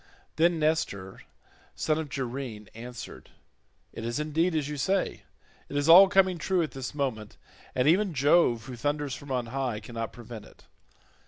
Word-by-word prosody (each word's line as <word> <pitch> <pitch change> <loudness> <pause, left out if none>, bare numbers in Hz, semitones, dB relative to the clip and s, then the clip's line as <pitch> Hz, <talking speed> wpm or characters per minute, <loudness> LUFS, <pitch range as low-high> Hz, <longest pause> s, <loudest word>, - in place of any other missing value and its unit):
Then 170 +1 +3
Nestor 150 -12 -1 0.6
knight 155 -1 +1
of 155 -2 -4
Gerene, 125 -6 -5
answered, 120 0 -9 0.6
"It - - -7
is 120 +4 -2
indeed 160 +3 0
as 150 -3 0
you 150 - -4
say; 185 +8 0 0.5
it 145 - -3
is 145 +1 0
all 180 +4 +10
coming 190 -3 +3
true 185 +1 +1
at 155 - -4
this 135 +1 -6
moment, 120 -7 -3 0.4
and 125 +2 +2
even 185 +1 +3
Jove 135 -4 +3
who 130 -2 -7
thunders 145 +2 -2
from 140 +2 -8
on 125 -2 0
high 130 -5 -1
cannot 115 +1 -6
prevent 115 -3 -10
it. - - -19
140 Hz, 165 wpm, -28 LUFS, 120-160 Hz, 0.6 s, all